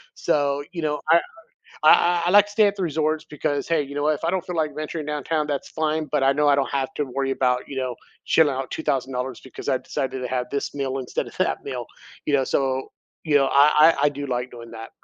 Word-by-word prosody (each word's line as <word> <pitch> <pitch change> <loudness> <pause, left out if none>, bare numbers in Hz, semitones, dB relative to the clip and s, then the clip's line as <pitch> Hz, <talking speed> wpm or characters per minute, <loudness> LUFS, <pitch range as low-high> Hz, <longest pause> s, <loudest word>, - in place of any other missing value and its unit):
So, 145 -1 0
you 175 -3 -5
know, 150 -1 -1
I 170 - +7 0.6
I 175 0 +5
I, - - +3
like, 205 +1 +7
to 205 - -11
stay 215 0 +4
at 200 0 0
the 195 - -3
resorts 155 -1 -1
because, 145 -1 -2
hey, 165 -3 +2
you 140 0 -9
know 145 0 -1
what? 155 +1 +3
If 150 - -7
I 165 - +2
don't 185 -1 -1
feel 180 - -4
like 155 -2 -1
venturing 155 +1 -4
downtown, 150 +1 -2
that's 145 -2 -3
fine, 155 0 -1
but 150 -2 +1
I 135 0 +4
know 145 +1 +2
I 145 - +5
don't 140 -1 0
have 140 +2 -2
to 145 - -1
worry 135 0 -2
about, 125 -1 0
you 140 - -7
know, 130 -2 -2 0.3
shelling 150 -4 +3
out 130 0 -4
$2,000 130 -1 -2
because 130 - -9
I - - +3
decided 130 0 -4
to 125 - -3
have 125 -1 -1
this 140 0 -3
meal 135 -1 -2
instead 125 - -3
of - - -12
that - - 0
meal, - - -4 0.4
you - - -1
know, 135 -2 +3
so 130 0 -1 0.3
you 155 -3 0
know 135 -1 +3
I 150 +3 +6
I - - +2
I - - +6
do 145 0 -6
like 125 -1 -2
doing 115 -1 -11
that. 115 0 -9
145 Hz, 250 wpm, -23 LUFS, 135-155 Hz, 0.6 s, I